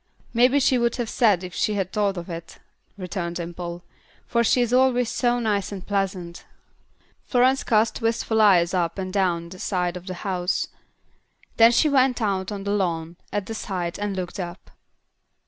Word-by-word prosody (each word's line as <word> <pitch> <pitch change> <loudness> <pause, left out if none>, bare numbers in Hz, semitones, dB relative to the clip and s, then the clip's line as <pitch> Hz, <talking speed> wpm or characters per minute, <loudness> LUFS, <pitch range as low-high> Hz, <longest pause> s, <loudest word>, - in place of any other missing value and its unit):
'" - - -32
"Maybe 250 +4 +4
she 255 -1 +3
would 235 0 +1
have 240 -3 -3
said 210 -7 +3
that - - -6
if 180 - -9
she 210 - 0
had 190 -2 -2
thought 200 -2 0
of 170 - -6
it," 170 -2 -8 0.4
returned 180 -2 -4
Dimple, 175 0 -6 0.4
"for 235 -1 +1
she 235 - +3
is 240 0 0
always 250 -2 +3
so 245 -1 +1
nice 210 -4 -1
and 195 -2 -7
pleasant." 190 -4 -3 0.8
Florence 255 +1 +2
cast 220 +2 +1
wistful 225 -1 +1
eyes 185 -4 +5
up 170 -1 0
and 185 -1 -4
down 175 -4 0
the 185 +1 -11
side 180 -2 -1
of 180 +1 -9
the 185 - -4
house; 180 -2 -1 0.9
then 230 +1 +7
she 275 +6 +3
went 265 -3 +3
out 195 -3 -1
on 200 -1 -5
the 200 - -2
lawn, 170 -4 -1 0.2
at 205 -2 -2
the 225 - -5
side, 180 -5 -4
and 205 -1 -2
looked 185 +2 -5
up. 175 +1 -7
195 Hz, 185 wpm, -24 LUFS, 180-230 Hz, 0.9 s, then